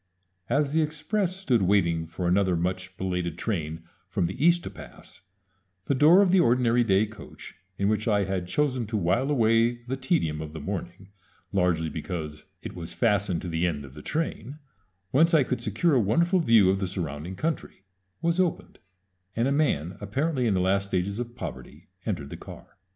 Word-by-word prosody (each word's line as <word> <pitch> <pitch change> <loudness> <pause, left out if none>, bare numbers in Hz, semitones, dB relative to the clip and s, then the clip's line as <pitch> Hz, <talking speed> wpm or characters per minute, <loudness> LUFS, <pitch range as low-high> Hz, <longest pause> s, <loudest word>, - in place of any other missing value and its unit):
As 140 +3 +1
the 160 +1 +2
express 165 +5 -1
stood 135 - +1
waiting 85 -4 +2
for 85 +2 -4
another 95 0 +2
much 95 +2 -3
belated 90 -3 -2
train 80 -6 -3 0.3
from 95 -5 0
the 95 - -3
East 175 +1 +4
to - - -6
pass, - - -13 0.6
the - - +1
door 160 +9 +6
of 185 - +2
the 190 - +5
ordinary 120 -5 +3
day 100 -1 +3
coach 110 -1 -11 0.2
in 100 - +1
which 110 +1 0
I 105 -2 +3
had 95 -2 -3
chosen 130 +2 0
to 110 0 -2
while 100 +9 +1
away 115 -2 +2
the 125 +2 -3
tedium 130 - 0
of 75 -1 -7
the 80 - -6
morning, 95 -1 -6 0.4
largely 90 -4 +1
because 75 -1 -6 0.2
it - - -6
was 85 -1 -7
fastened 100 -6 +1
to - - -4
the 85 +1 0
end 75 -4 -3
of 65 - -13
the 75 - -10
train, 150 - -3 0.5
whence 165 +5 +4
I 150 - +5
could 125 0 -3
secure 120 - +1
a 130 - +4
wonderful 170 - +2
view 115 - +5
of 95 - -1
the 95 - -1
surrounding 85 -1 -5
country 155 - -4 0.4
was 170 +2 +1
opened, 180 -3 -1 0.6
and 115 +3 +1
a - - +1
man 95 - 0
apparently 130 +5 -1
in 105 - +2
the 90 - +1
last 100 +2 +1
stages 100 +3 -1
of 120 0 -5
poverty - - -8 0.2
entered - - -3
the - - -6
car. - - -12
105 Hz, 190 wpm, -26 LUFS, 90-135 Hz, 0.6 s, door